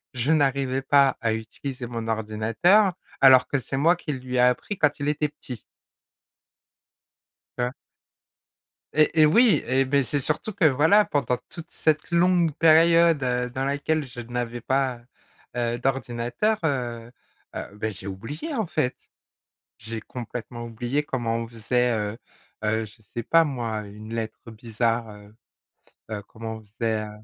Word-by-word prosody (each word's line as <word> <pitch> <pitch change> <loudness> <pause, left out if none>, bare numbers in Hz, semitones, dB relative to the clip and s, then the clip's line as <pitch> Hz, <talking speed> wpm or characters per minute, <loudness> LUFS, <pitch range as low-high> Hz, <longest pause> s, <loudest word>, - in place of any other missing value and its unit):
je 125 +6 +1
n'arrivais 135 -3 +1
pas 140 -1 +4
à 110 -1 +1
utiliser 120 +3 -6
mon 115 -1 -5
ordinateur 115 - +2 0.3
alors 130 -2 +7
que 140 - 0
c'est 130 +3 -5
moi 165 +5 +4
qui 150 -4 -4
lui 130 -1 -6
ai - - +3
appris 125 +11 +1
quand 150 0 +2
il 145 +1 0
était 150 0 0
petit 125 -5 -9 2.0
tu 125 - -1
vois? 125 - -2 1.2
Et 155 +1 +3
et - - +8
oui, 210 - +5
et 135 +1 +3
beh, 140 +1 +2
c'est 145 +3 -1
surtout 150 +10 -1
que, 185 -3 0
voilà, 160 +9 +5
pendant 125 -4 0
toute 170 -1 -10
cette 155 +1 0
longue 170 -2 +3
période, 165 -1 +5
heu, 125 -1 0
dans 130 +2 -3
laquelle 145 +2 0
je 120 -1 -9
n'avais 120 0 -4
pas, 130 -1 0 0.6
heu, 120 0 -1
d'ordinateur, 130 - -1
heu, 120 -5 -2 0.4
heu, - - -3
beh, 110 +1 -3
j'ai 95 +1 -8
oublié, 140 - -6
en 220 -6 -1
fait. 125 -5 -1 0.8
J'ai 110 0 -6
complètement 120 0 -7
oublié 120 +6 -2
comment 120 -5 -2
on 115 0 -4
faisait, 120 +2 0
heu, 105 +1 -3 0.5
heu, 110 +1 0
je 105 +2 -17
sais 120 - -2
pas 165 +5 +5
moi, 120 -7 -3
une 105 +2 -10
lettre 115 +1 -5
bizarre, 115 +1 -1
heu, 105 +1 -15 0.8
heu, 105 -1 -3
comment 110 0 -7
on - - -11 0.2
faisait, 110 -2 0
heu - - -8
125 Hz, 155 wpm, -25 LUFS, 115-150 Hz, 2.0 s, et